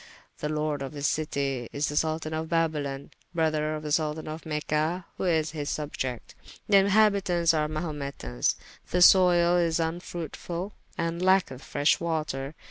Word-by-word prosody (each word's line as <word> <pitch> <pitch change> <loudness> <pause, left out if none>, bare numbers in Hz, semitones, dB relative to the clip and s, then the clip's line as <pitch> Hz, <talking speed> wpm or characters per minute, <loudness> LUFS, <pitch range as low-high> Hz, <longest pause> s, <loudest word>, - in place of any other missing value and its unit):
The 150 - -2
lord 150 -1 -1
of 135 +2 -5
this 145 -1 -4
citie 140 -5 -1
is 145 +1 -1
the 150 - -4
Soltan 155 0 0
of 160 0 -3
Babylon, 150 -5 -1 0.2
brother 155 -1 +1
to 155 - -5
the 150 - -4
Soltan 155 0 0
of 155 +2 -6
Mecha, 155 +3 -1
who - - -2
is 160 -3 +1
his 150 -2 -4
subiecte. 130 -5 -4 0.3
The 200 - +6
inhabitauntes 195 -4 +3
are 150 -1 +1
Mahumetans. 145 - -2 0.3
The 180 0 +4
soyle 175 -2 +6
is 165 -2 +2
vnfruitfull, 170 +2 -4 0.3
and 170 +1 -2
lacketh 185 -8 +2
freshe 145 +1 +2
water. 155 -4 -3
155 Hz, 150 wpm, -27 LUFS, 150-170 Hz, 0.3 s, The